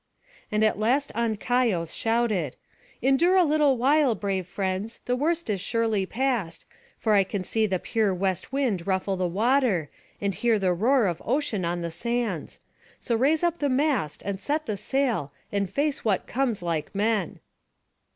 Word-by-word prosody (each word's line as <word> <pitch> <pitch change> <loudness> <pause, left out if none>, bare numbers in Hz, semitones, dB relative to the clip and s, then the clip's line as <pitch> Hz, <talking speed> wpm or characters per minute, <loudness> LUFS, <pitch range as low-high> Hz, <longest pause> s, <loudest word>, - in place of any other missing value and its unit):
] - - -29
And 215 0 +2
at 215 -1 +2
last 260 +6 +1
Ancaios 225 -5 0
shouted: 225 - 0 0.5
"Endure 275 +8 +4
a 370 - +6
little 295 -4 +3
while, 270 0 +3
brave 190 -2 -2
friends, 190 +3 -3
the 250 - +1
worst 330 +5 0
is 200 -4 -1
surely 220 -2 0
past; 230 -10 -2 0.3
for 220 - +1
I 200 -1 +5
can 190 0 -4
see 220 +3 +1
the 190 -2 0
pure 215 +2 0
west 185 +1 -2
wind 240 -11 -1
ruffle 190 0 0
the 185 -1 0
water, 210 - +1 0.3
and 200 -1 -1
hear 230 +2 +2
the 190 -3 +1
roar 235 +6 +3
of 175 -4 -2
ocean 240 -6 -1
on 175 +1 -2
the 170 -1 -3
sands. 225 -1 -3 0.4
So 235 - -1
raise 290 +8 +2
up 345 -1 +1
the 285 - +1
mast, 260 - 0
and 195 -1 -3
set 305 +2 -1
the 215 - -2
sail, 240 - -1 0.2
and 200 -2 -1
face 285 +7 -1
what 205 -4 +1
comes 240 -7 -1
like 165 +1 -3
men." 210 -3 0
220 Hz, 170 wpm, -26 LUFS, 190-265 Hz, 0.5 s, a